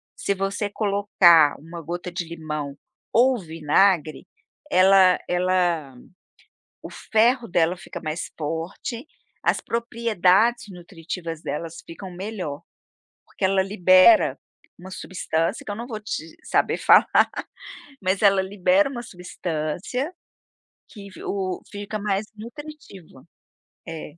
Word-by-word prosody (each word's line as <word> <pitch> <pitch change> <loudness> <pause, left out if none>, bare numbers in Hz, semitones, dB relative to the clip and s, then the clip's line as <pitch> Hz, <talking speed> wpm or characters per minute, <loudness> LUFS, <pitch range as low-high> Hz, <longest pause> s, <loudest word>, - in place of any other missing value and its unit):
se 200 - -1
você 195 +2 -2
colocar 200 -7 +4
uma 165 +2 -9
gota 175 +3 -5
de 175 0 -4
limão 150 -4 -5 0.4
ou 250 +1 +4
vinagre, 160 0 +1 0.4
ela 190 -3 +6
ela 175 -6 0 0.9
o - - -8
ferro 235 +2 +1
dela 170 0 +1
fica 185 - -9
mais 155 +1 -4
forte, 165 - -5 0.4
as - - +2
propriedades 230 -1 +1
nutritivas 170 -2 -7
delas 165 +2 -5
ficam 185 +3 -9
melhor, 180 -6 -6 0.6
porque - - -10
ela 190 0 +3
libera 190 - +5 0.4
uma 185 - -10
substância 180 -1 -2
que - - -5
eu - - -4
não 235 +3 -6
vou 220 -4 -5
te 165 -6 -6
saber - - +1
falar, - - +6 1.0
mas 190 +1 0
ela 195 -2 +5
libera 205 +10 +2
uma 245 -3 -6
substância, 180 - -4 0.8
que 200 -2 -11
v - - -12
o 190 -2 -3
fica 205 +1 -5
mais 205 0 -1
nutritiva. 230 - -11 0.6
É. 165 -1 -6
185 Hz, 115 wpm, -23 LUFS, 165-210 Hz, 1.0 s, ela